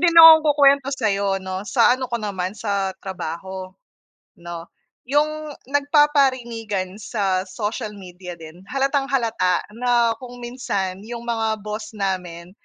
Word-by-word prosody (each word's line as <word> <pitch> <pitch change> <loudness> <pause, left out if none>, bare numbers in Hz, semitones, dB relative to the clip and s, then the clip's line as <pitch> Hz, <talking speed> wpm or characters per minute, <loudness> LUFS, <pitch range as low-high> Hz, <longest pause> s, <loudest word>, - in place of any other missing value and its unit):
din 340 -1 +3
akong 325 -1 +11
ku-kwento 280 -2 +4
sayo 200 -6 0
'no, 190 0 -4
sa 240 +1 +5
ano 255 -1 -4
ko 235 - -1
naman 200 -3 -4
sa 200 -3 -1
trabaho, 190 0 -6 0.7
no? 170 0 -8 0.4
Yung 300 +2 0 0.2
nagpaparinigan 255 - +1
sa 195 -3 -1
social 210 +3 -4
media 180 -2 -9
din 160 0 -12
halatang-halata 270 -8 +1
na 240 -1 +2
kung 245 -1 -10
minsan 200 -7 -3
yung 235 0 -6
mga 225 -3 -1
boss 215 +1 -6
namin, 180 -3 -3
220 Hz, 125 wpm, -22 LUFS, 190-260 Hz, 0.7 s, akong